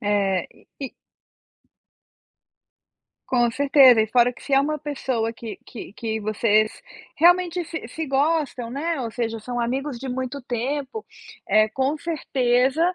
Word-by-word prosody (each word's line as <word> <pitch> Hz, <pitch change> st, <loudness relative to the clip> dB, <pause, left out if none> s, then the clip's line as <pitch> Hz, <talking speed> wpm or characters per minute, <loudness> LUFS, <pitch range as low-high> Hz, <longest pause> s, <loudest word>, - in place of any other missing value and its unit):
É, 200 Hz, -3 st, +1 dB, 0.3 s
e 270 Hz, -, -4 dB, 2.4 s
Com 240 Hz, -2 st, +2 dB
certeza. 270 Hz, -2 st, +6 dB
E 220 Hz, -, +2 dB
fora 245 Hz, +2 st, +3 dB
que -, -, -16 dB
se 275 Hz, -, 0 dB
é 270 Hz, -, +6 dB
uma 305 Hz, +2 st, -1 dB
pessoa 265 Hz, -6 st, -2 dB
que 225 Hz, -1 st, -8 dB
que 215 Hz, -5 st, -9 dB
que 220 Hz, 0 st, -3 dB
vocês 215 Hz, 0 st, +2 dB, 0.4 s
realmente 355 Hz, +1 st, +3 dB
se 320 Hz, -6 st, -6 dB
se 315 Hz, +5 st, -5 dB
gostam, 275 Hz, -4 st, 0 dB
né, 310 Hz, +4 st, -2 dB
ou 230 Hz, -, -4 dB
seja 230 Hz, -1 st, -3 dB
são 245 Hz, +2 st, -4 dB
amigos 260 Hz, +2 st, -2 dB
de 265 Hz, +1 st, -6 dB
muito 260 Hz, +2 st, -4 dB
tempo, 270 Hz, -, -3 dB, 0.4 s
eh, 215 Hz, 0 st, +4 dB
com 270 Hz, +6 st, -1 dB
certeza 265 Hz, -3 st, +1 dB
255 Hz, 140 wpm, -23 LUFS, 230-285 Hz, 2.4 s, certeza